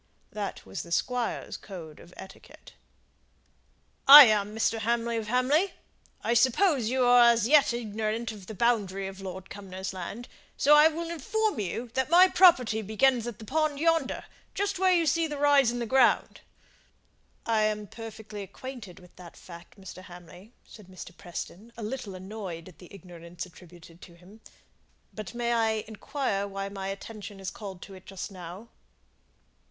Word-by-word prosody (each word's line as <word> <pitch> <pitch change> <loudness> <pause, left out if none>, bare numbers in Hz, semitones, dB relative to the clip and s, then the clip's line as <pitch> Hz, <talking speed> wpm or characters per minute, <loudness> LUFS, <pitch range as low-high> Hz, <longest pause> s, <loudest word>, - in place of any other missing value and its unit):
That 205 -2 -6
was - - -6
the 170 - -12
Squire's 245 +6 -2
code 165 -6 -10
of 175 - -15
etiquette. 190 - -14 1.3
"I 290 +2 +13
am 210 -1 +1
Mr. 225 0 0
Hamley 235 +1 -1
of 220 -1 -4
Hamley. 270 - +1 0.5
I 235 - +1
suppose 260 - +2
you 255 0 +1
are 245 -1 +7
as 230 -2 +2
yet 290 -1 +5
ignorant 225 0 -3
of 200 -4 -12
the 220 - -8
boundary 195 -4 0
of 195 0 -8
Lord 190 -1 -8
Cumnor's 190 -1 -7
land, 190 +6 -7
and - - -21 0.3
so 295 +2 +5
I 300 +1 +7
will 330 +1 -4
inform 430 - -1
you 225 +5 -4
that 265 +2 -1
my 360 +3 +7
property 260 - +4
begins 235 +3 +1
at 235 -4 -6
the 220 - -11
pond 305 +2 -1
yonder 330 +1 0 0.3
just 400 -2 -2
where 375 -1 +4
you 340 -2 +3
see 325 +2 +1
the 295 -1 -5
rise 285 -3 +4
in 240 - -3
the 240 - -3
ground." 260 +1 +2 1.0
"I 225 -1 +1
am 215 0 0
perfectly 220 -1 -9
acquainted 215 -1 -9
with 180 -1 -19
that 180 -2 -13
fact, 170 +2 -14
Mr. 185 -1 -10
Hamley," 180 +3 -14
said 210 -4 -15
Mr. 185 -1 -11
Preston, 200 +4 -9
a 230 - -7
little 215 -3 -5
annoyed 185 -3 -8
at 180 - -16
the 180 - -15
ignorance 175 -2 -10
attributed 175 -1 -16
to 170 - -14
him. 190 +6 -18 0.7
"But 215 +1 -8
may 240 0 -1
I 225 -1 +2 0.2
inquire 220 -2 -3
why 195 0 -5
my 195 -1 -6
attention 205 0 -8
is 190 -1 -5
called 195 -4 -9
to 195 - -12
it 185 -1 -14
just 195 +1 -7
now?" 185 +4 -10
220 Hz, 170 wpm, -27 LUFS, 190-255 Hz, 1.3 s, I